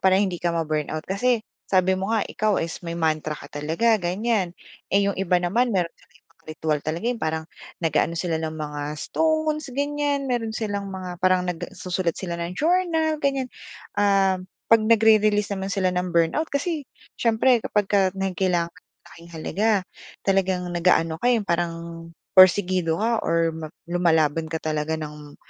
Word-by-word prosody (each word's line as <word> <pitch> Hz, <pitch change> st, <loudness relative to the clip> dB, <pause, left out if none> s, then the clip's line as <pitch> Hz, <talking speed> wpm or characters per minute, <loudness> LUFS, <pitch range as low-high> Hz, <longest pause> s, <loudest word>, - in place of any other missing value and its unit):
para 190 Hz, 0 st, +4 dB
hindi 190 Hz, -3 st, 0 dB
ka 175 Hz, -, 0 dB
ma-burnout? 155 Hz, -1 st, -2 dB
Kasi, 225 Hz, +4 st, 0 dB, 0.2 s
sabi 185 Hz, -1 st, +3 dB
mo 190 Hz, +1 st, -3 dB
nga 220 Hz, -, +2 dB
ikaw 215 Hz, 0 st, 0 dB
is 165 Hz, 0 st, -4 dB
may 170 Hz, -1 st, -5 dB
mantra 155 Hz, -2 st, 0 dB
ka 140 Hz, -, -11 dB
talaga, 165 Hz, +11 st, +2 dB
ganyan, 185 Hz, 0 st, -1 dB, 0.3 s
eh, 200 Hz, +1 st, +3 dB
yung 200 Hz, -, -2 dB
iba 180 Hz, -1 st, +2 dB
naman 230 Hz, +8 st, +1 dB
meron 175 Hz, -2 st, 0 dB
silang 165 Hz, 0 st, -25 dB
ibang 165 Hz, -, -34 dB
ritwal 155 Hz, -1 st, -1 dB
talaga. 160 Hz, +6 st, -3 dB
‘Yong 245 Hz, -2 st, -2 dB
parang 160 Hz, 0 st, -1 dB, 0.4 s
nag-aano 165 Hz, 0 st, +1 dB
sila 165 Hz, -1 st, -1 dB
ng 160 Hz, -1 st, -3 dB
mga 150 Hz, -1 st, -5 dB, 0.2 s
stones, 315 Hz, -, 0 dB
ganyan, 285 Hz, +1 st, -1 dB
meron 235 Hz, -3 st, -1 dB
silang 205 Hz, -2 st, -3 dB
mga 185 Hz, -1 st, -6 dB
parang 185 Hz, -1 st, +3 dB
nagsusulat 180 Hz, 0 st, -3 dB
sila 175 Hz, -3 st, -4 dB
ng 170 Hz, +1 st, -3 dB
journal, 325 Hz, -1 st, +2 dB
ganyan. 275 Hz, -3 st, 0 dB, 0.5 s
Um, 195 Hz, -2 st, +2 dB, 0.2 s
‘pag 225 Hz, -1 st, +6 dB
nagre-release 215 Hz, -2 st, +4 dB
naman 195 Hz, 0 st, -3 dB
sila 190 Hz, -2 st, +1 dB
ng 180 Hz, 0 st, -2 dB
burnout 170 Hz, -, +2 dB
kasi 295 Hz, +1 st, -1 dB, 0.3 s
siyempre 235 Hz, +1 st, +3 dB
kapagka 195 Hz, -2 st, +2 dB
may 195 Hz, 0 st, -1 dB
kailangan 175 Hz, -3 st, +1 dB
kang 180 Hz, -, -21 dB
kitaing -, -, -64 dB
malaking 170 Hz, +1 st, -14 dB
halaga, 195 Hz, +7 st, 0 dB, 0.5 s
talagang 190 Hz, -2 st, +1 dB
nag-aano 170 Hz, -2 st, +2 dB
ka -, -, 0 dB
eh, 250 Hz, -, +5 dB
yung 205 Hz, -, -9 dB
parang 170 Hz, -1 st, 0 dB, 0.6 s
pursigido 185 Hz, -3 st, +5 dB
ka 225 Hz, +4 st, +1 dB
or 165 Hz, 0 st, +1 dB
ma 160 Hz, -1 st, -6 dB, 0.2 s
lumalaban 165 Hz, -2 st, +1 dB
ka 160 Hz, -, -3 dB
talaga 155 Hz, 0 st, -1 dB
nang 150 Hz, -1 st, -8 dB
185 Hz, 165 wpm, -24 LUFS, 165-220 Hz, 0.6 s, pag